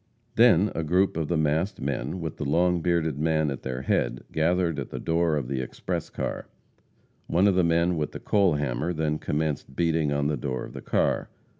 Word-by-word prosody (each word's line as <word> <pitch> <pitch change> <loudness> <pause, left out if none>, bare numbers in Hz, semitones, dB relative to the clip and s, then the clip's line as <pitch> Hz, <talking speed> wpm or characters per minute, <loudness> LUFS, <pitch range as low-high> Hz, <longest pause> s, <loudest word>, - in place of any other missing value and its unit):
Then 110 -5 +5
a 80 - -2
group 90 +5 +2
of 80 -2 -1
the 85 - 0
masked 80 +6 0
men, 70 +6 -3
with 80 -2 -5
the - - -3
long 85 +4 +2
bearded 80 -4 0
man 80 -1 +1
at 70 - -5
their 65 0 -4
head, - - 0
gathered 85 0 +1
at 70 - -5
the - - -6
door 85 -1 +1
of 70 -5 -2
the 65 0 -2
express 65 - -4
car. - - -4 0.8
One 95 +4 +3
of 100 - +4
the 90 0 +3
men 85 +1 +2
with 75 -1 -2
the - - -7
coal 100 -6 +2
hammer 75 +3 -1
then 75 -1 -1
commenced 75 -3 -2
beating 80 -2 +1
in 70 0 0
the 75 0 0
door 65 -3 -3
of - - -12
the - - -7
car. - - 0
80 Hz, 205 wpm, -26 LUFS, 75-85 Hz, 0.8 s, Then